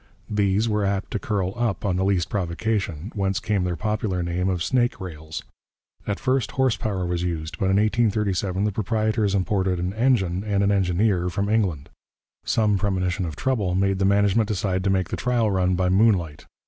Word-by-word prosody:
These 105 +1 +2
were 105 -2 0
apt 100 0 -1
to - - -1
curl 100 -8 -1
up 115 -5 -1
on 95 -3 +1
the 95 - 0
least 95 -3 +1
provocation, 95 -1 -2
whence 100 -2 0
came 105 -4 0
their 90 -1 -1
popular 105 0 -1
name 90 +2 -1
of 90 -3 -1
'snake 120 -4 +1
rails.' 80 -4 -7 0.6
At 100 -4 -2
first 130 +1 0
horse 130 -3 +2
power 100 -5 -2
was 85 0 -1
used, 85 -3 -4
but - - +1
in 95 0 +2
1837 105 -3 +1
the 105 - +1
proprietors 110 0 0
imported 95 -1 0
an 90 +2 -2
engine 105 -6 +1
and 100 -2 0
an 100 - +3
engineer 95 -1 +1
from 100 +3 -2
England. 95 -10 0 0.5
Some 105 -3 +2
premonition 95 -1 -1
of 80 - -6
trouble 105 - 0
made 95 0 +1
the 95 - +2
management 100 +2 +3
decide 95 -3 -1
to - - +2
make 95 -2 +1
the - - -3
trial 120 -4 +1
run 95 -1 +1
by 90 0 +1
moonlight. 95 -6 +2
100 Hz, 185 wpm, -24 LUFS, 90-105 Hz, 0.6 s, an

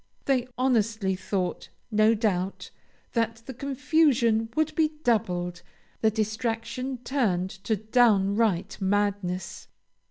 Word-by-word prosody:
They 255 -3 +1
honestly 220 -6 +1
thought, 185 -1 -3 0.2
no 215 +1 +4
doubt, 195 -4 -1 0.4
that 230 -1 -1
the 265 - -7
confusion 265 -4 +2
would 315 0 +1
be 315 0 +1
doubled, 180 -6 0 0.4
the 220 - +4
distraction 225 +4 -2
turned 195 -9 0
to 220 - +2
downright 210 -3 +2
madness. 195 -2 -1
220 Hz, 100 wpm, -27 LUFS, 195-250 Hz, 0.4 s, no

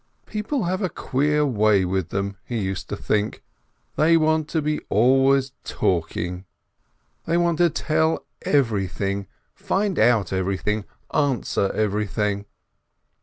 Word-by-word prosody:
People 215 +5 -2
have 185 +3 -1
a 185 - 0
queer 150 +2 0
way 105 -6 +3
with 90 -1 -1
them, 100 0 -2
he 120 - -4
used 95 -3 -3
to - - -2
think, 105 0 -1 0.5
they 165 +2 +5
want 155 -1 +2
to 160 - -1
be 150 0 -1
always 135 +4 +4
talking! 90 +1 -2 0.8
They 165 +1 +1
want 170 -2 +1
to 175 -1 +5
tell 160 0 0 0.2
everything, 100 - 0 0.3
find 195 0 -1
out 110 -7 +3
everything, 95 +3 -1 0.3
answer 130 -8 +1
everything! 105 -1 -1
120 Hz, 125 wpm, -23 LUFS, 100-155 Hz, 0.8 s, they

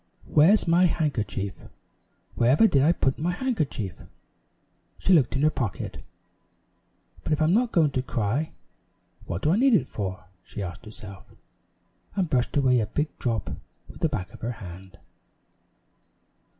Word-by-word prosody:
"Where's 175 +7 +4
my 175 +2 +5
handkerchief? 110 - -1 0.7
Where 120 - +2
ever 145 - +6
did 140 -11 +4
I 150 +5 +5
put 135 -6 0
my 170 +4 0
handkerchief?" 155 - -2 1.0
She 190 - +2
looked 140 -8 +4
in 135 - 0
her 155 - +4
pocket. 105 - -4 1.2
"But - - 0
if 150 - 0
I'm 155 +2 +3
not 235 +2 +2
going 155 -4 +3
to 130 - 0
cry, 125 +4 -1 0.8
what 85 +4 -4
do 155 - +3
I 185 - +3
need 260 0 +5
it 190 - +2
for?" 95 -3 -5 0.2
she 100 - -6
asked 85 -2 -7
herself, 105 -2 -11 0.8
and 190 -5 0
brushed 125 +2 +1
away 130 -3 +4
a 110 - -1
big 150 +8 -2
drop 115 -6 -2 0.4
with - - -13
the 165 - +1
back 95 - -4
of - - -13
her 120 +2 -2
hand. 95 -4 -11
135 Hz, 155 wpm, -26 LUFS, 105-165 Hz, 1.2 s, ever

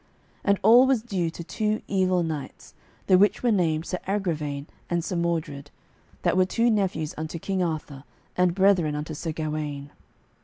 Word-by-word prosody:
And 200 -1 +2
all 240 +5 +7
was 260 -5 +2
due 185 -8 -1
to 170 +1 -8
two 215 +4 -2
evil 185 -2 +1
knights, 155 -4 -6 0.3
the 185 -1 +5
which 205 +4 +3
were 240 - +3
named 165 -5 +1
Sir 180 - -3
Agravaine 155 -8 -2 0.2
and 170 -1 0
Sir 185 - -3
Mordred, 160 -4 -2 0.5
that - - +2
were 185 0 +3 0.2
nephews 185 -7 -1
unto 160 +1 -4
King 190 +3 -2
Arthur 155 -5 -3 0.3
and 180 -1 +2
brethren 185 -6 +3
unto 150 +2 -4
Sir 160 +2 -4
Gawaine. 150 -2 -4
170 Hz, 160 wpm, -25 LUFS, 155-195 Hz, 0.5 s, all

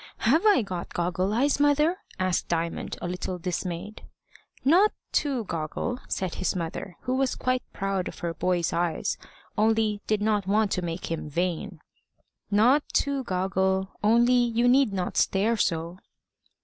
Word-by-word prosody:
"Have 295 +10 +4
I 405 - +5
got 180 -3 -6
goggle 180 +2 0
eyes, 270 +6 +2
mother?" 300 +4 +3 0.2
asked 185 -2 0
Diamond, 170 0 -2
a - - -1
little 180 +1 -3
dismayed. 180 +3 -4 0.6
"Not 365 +9 +5 0.2
too 270 -5 0
goggle," 170 +8 -3
said 185 -3 -2
his 185 - -1
mother, 170 +1 -5
who 255 - -1
was 265 -1 +1
quite 255 0 0
proud 195 -2 -2
of - - -8
her 170 - -1
boy's 175 0 0
eyes, 170 -1 -1 0.4
only 220 -1 +2
did 215 -1 +1
not 210 -3 +1
want 210 0 +2
to 185 - 0
make 170 0 -4
him 160 -2 -3
vain. 175 +2 -2 0.7
"Not 235 +8 +4
too 280 -1 +1
goggle; 190 0 0
only 235 +3 +4
you 240 -1 +3
need 260 -2 +4
not 185 -2 -3
stare 210 +4 +2
so." 170 -3 -1
195 Hz, 150 wpm, -26 LUFS, 180-240 Hz, 0.7 s, I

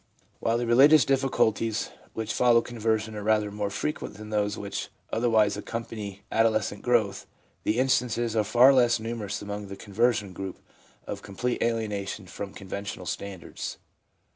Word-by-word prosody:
While 115 +1 +1
the 120 - -1
religions 135 +6 +7
difficulties 115 -5 +1 0.2
which 110 0 -3
follow 120 -1 +5
con 120 -1 -9
version 110 0 0
are 105 - -4
rather 105 0 +2
more 105 0 -2
frequent 150 +7 -3
than 105 +1 -9
those 105 0 0
which 100 0 -4 0.2
other 120 +2 +2
wise 105 -3 +4
accampany 105 -2 -6
adolescent 110 -3 +1
growth, 110 -5 +1 0.4
the 110 - +1
instances 125 -3 +1
ai'e 110 - +3
far 120 +6 +6
less 120 -3 +4
numerous 110 -3 -4
among 105 0 -5
the 100 - -7
conversion 105 -1 0
group 95 0 -6 0.5
of - - -5
complete 120 +5 -3
alienation 105 -4 -2
from 95 +2 -7
conventional 100 -1 -6
standards. 95 -1 -5
110 Hz, 150 wpm, -27 LUFS, 100-120 Hz, 0.5 s, religions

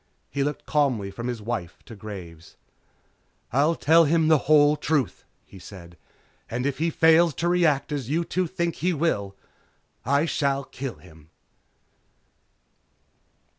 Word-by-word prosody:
He 140 - -1
looked 145 +1 -4
calmly 130 -10 0
from 115 +5 -6
his 120 -4 -4
wife 100 -7 -4
to 115 - -11
Graves. 90 -6 -10 1.0
"I'll 150 +6 +3
tell 165 +2 +4
him 160 +1 +2
the 155 -2 +5
whole 150 -1 +6
truth," 150 -5 -1 0.2
he 95 - -14
said, 85 -2 -12 0.5
"And 125 +3 -3
if 140 -1 -2
he 165 +1 +1
fails 165 0 +4
to 170 - -1
react 170 -6 +2
as 140 -5 -4
you 165 +3 0
two 185 +1 -1
think 170 -1 -3
he 180 +3 0
will, 105 -12 -1 0.7
I 140 +5 +2
shall 140 -4 0
kill 130 -1 -7
him." 80 -3 -18
140 Hz, 140 wpm, -25 LUFS, 110-160 Hz, 1.0 s, whole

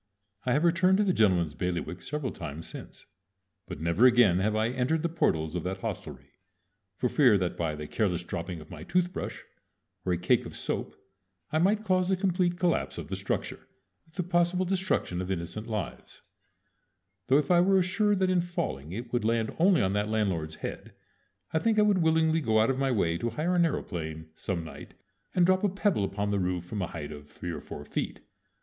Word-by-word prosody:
I 125 - +3
have 150 +5 +2
returned 180 +2 +4
to 210 - +3
the 190 -3 +2
gentleman's 90 - +3
bailiwick 90 +2 -3
several 150 -4 -3
times 75 +3 -7
since; - - -10 0.6
but - - -7
never 85 +9 +5
again 120 -8 +5
have 105 +3 +1
I 110 +1 +2
entered 130 +6 0
the 170 - +1
portals 80 - 0
of 90 - -1
that 95 +1 -3
hostelry, - - -6 0.6
for 125 - 0
fear 125 -5 +5
that 90 -2 -1
by 80 -3 -2
the 75 0 -6
careless 90 -1 0
dropping 85 0 -5
of - - -14
my - - -8
tooth 180 0 0
brush - - -5 0.6
or 90 - -1
a 90 - +2
cake 90 - +2
of - - -10
soap - - -3 0.6
I 155 - +2
might 205 +5 +2
cause 185 -2 +2
the 190 - +3
complete 180 -2 +1
collapse 175 -2 0
of - - -6
the - - -2
structure, - - -3 0.4
with 160 - -23
the 180 - -1
possible 175 +1 +1
destruction 180 - 0
of 95 - -5
innocent 95 +4 -3
lives; 105 -6 -5 1.0
though 135 - +5
if 150 +3 +1
I 175 -1 +6
were 190 +2 +4
assured 200 +3 +2
that 185 - +3
in 180 -1 +3
falling 80 - -4
it 120 +3 -6
would 120 - +1
land 115 0 0
only 180 - +5
on 95 0 +1
that 105 +1 0
landlord's 95 -8 -1
head - - -7 0.6
I 160 - +3
think 225 +4 +1
I 210 - +6
would 205 -3 +3
willingly 160 0 +3
go 110 -5 +2
out 110 +4 +4
of 130 - -2
my 135 -1 +1
way 85 -9 +1
to 120 - -1
hire 155 +10 -1
an 175 - +3
aëroplane 80 - -2
some 90 -2 -3
night 80 - -10 0.4
and 180 - +5
drop 185 +2 +3
a 205 - +3
pebble 195 - +1
upon 100 +1 -1
its 100 - +1
roof 90 -1 -1
from 100 +3 -4
a 90 - -1
height 75 -3 -6
of 75 -1 -10
three 85 +4 -6
or 75 -3 -5
four 75 - -8
feet. - - -4
115 Hz, 210 wpm, -28 LUFS, -, 1.0 s, I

